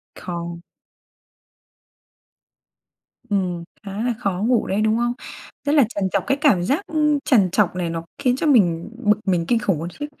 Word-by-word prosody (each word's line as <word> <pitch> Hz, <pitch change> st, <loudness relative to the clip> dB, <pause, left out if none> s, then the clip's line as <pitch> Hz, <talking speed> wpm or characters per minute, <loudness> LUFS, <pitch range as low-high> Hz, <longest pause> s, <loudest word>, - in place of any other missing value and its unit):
Không. 170 Hz, -1 st, -6 dB, 2.7 s
Ừm, 180 Hz, -4 st, -1 dB, 0.2 s
khá 200 Hz, +2 st, -4 dB
là 245 Hz, 0 st, +1 dB
khó 195 Hz, -5 st, -1 dB
ngủ 245 Hz, -3 st, +2 dB
đấy, 200 Hz, +3 st, 0 dB
đúng 220 Hz, +1 st, +2 dB
không? 240 Hz, 0 st, 0 dB, 0.5 s
Rất 285 Hz, -, +1 dB
là 285 Hz, -, +7 dB
trằn 200 Hz, -4 st, -3 dB
trọc, 195 Hz, -, +1 dB
cái 275 Hz, -, +2 dB
cảm 255 Hz, -, +4 dB
giác, 280 Hz, -, +1 dB
ưm, 300 Hz, -2 st, +2 dB
trằn 200 Hz, -9 st, +4 dB
trọc 195 Hz, -2 st, +2 dB
này 180 Hz, -2 st, -2 dB
nó 165 Hz, 0 st, -4 dB
khiến 255 Hz, -3 st, +1 dB
cho 305 Hz, -, -1 dB
mình 175 Hz, -, +3 dB
bực 210 Hz, -2 st, +4 dB
mình 175 Hz, -3 st, +1 dB
kinh 235 Hz, +3 st, +2 dB
khủng 195 Hz, -6 st, 0 dB
luôn 165 Hz, +2 st, -4 dB
chứ. 295 Hz, -, -2 dB
205 Hz, 175 wpm, -22 LUFS, 175-250 Hz, 2.7 s, là